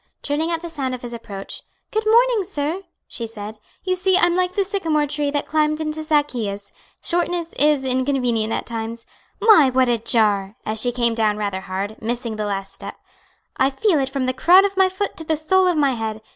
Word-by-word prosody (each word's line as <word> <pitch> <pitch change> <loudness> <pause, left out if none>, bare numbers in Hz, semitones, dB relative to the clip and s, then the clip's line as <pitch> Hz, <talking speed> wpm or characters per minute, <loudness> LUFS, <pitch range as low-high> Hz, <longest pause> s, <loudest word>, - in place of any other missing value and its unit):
Turning 300 +3 0
at 335 0 -2
the 340 - -5
sound 265 -5 -2
of 250 - -12
his 240 -1 -6
approach, 205 -4 -7 0.3
"Good 435 0 -1
morning, 470 -1 +4
sir," 330 -1 -3 0.3
she 230 - -5
said. 215 -1 -8 0.2
"You 370 - 0
see 370 0 +3
I'm 345 -1 +4
like 365 0 +1
the 395 - +1
sycamore 330 -7 0
tree 290 0 -1
that 290 0 -1
climbed 305 0 +1
into 310 0 -3
Zaccheus. 240 -10 -1 0.3
Shortness 345 -1 -1
is 295 -2 +2
inconvenient 255 -4 0
at - - -2
times. 230 0 -5 0.3
My, 415 - +6
what 255 -1 +2
a 235 -1 +1
jar!" 210 -3 +1
as 215 0 0
she 245 - +1
came 235 -1 +1
down 215 -2 +1
rather 200 -3 -3
hard, 195 +3 -5
missing 235 0 -3
the 210 - -2
last 195 -1 -4
step - - -8 0.6
"I 265 - +3
feel 320 +4 +1
it 270 -1 0
from 270 -1 -2
the 255 - 0
crown 360 +9 +6
of 395 0 -2
my 380 -1 +4
foot 380 +2 -3
to 320 - -5
the 315 -1 -1
sole 370 +5 +3
of 355 -3 +2
my 285 -2 +3
head. 220 -2 -4
275 Hz, 210 wpm, -21 LUFS, 225-340 Hz, 0.6 s, My